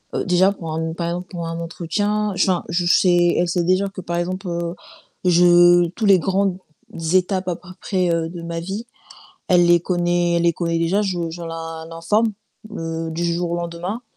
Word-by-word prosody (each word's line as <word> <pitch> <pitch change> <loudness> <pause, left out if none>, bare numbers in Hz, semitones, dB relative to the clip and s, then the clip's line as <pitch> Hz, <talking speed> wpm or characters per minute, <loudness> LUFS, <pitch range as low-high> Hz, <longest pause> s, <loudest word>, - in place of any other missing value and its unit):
heu, - - -1
déjà 185 +2 +4
pour 165 -5 -6
un 160 0 -2
par 170 0 -3
exemple 180 +1 -4
pour 170 -2 -5
un 165 0 -4
entretien, 205 +5 -2
je 185 - +2
enfin, 180 - -1
je 175 +1 0
sais 175 -1 +4
elle 175 - +2
sait 175 0 0
déjà 185 +3 +2
que 195 -1 -8
par 170 0 -3
exemple, 185 +2 -3
heu, 170 +1 -3 0.5
je 175 0 +6
tous 220 - -2
les 195 -2 +6
grandes 190 0 0 0.6
étapes 185 0 +1
à 175 - 0
peu 180 - -15
près, 185 -3 0
heu, 165 -1 -1
de 170 -1 -8
ma 170 0 -4
vie, 195 +7 -5 0.6
elle 175 -1 +5
les 175 -1 +5
connaît 175 -1 0
elle 170 - +1
les 170 0 +3
connaît 170 0 -1
déjà, 180 +5 +1
je 175 -4 -2
je 170 +1 -8
l'in 165 -1 -6
l'informe, 205 +7 0 0.4
heu, 165 -1 -4
du 170 +2 -3
jour 170 0 -1
au - - 0
lendemain. 175 +7 -4
175 Hz, 205 wpm, -21 LUFS, 170-185 Hz, 0.6 s, je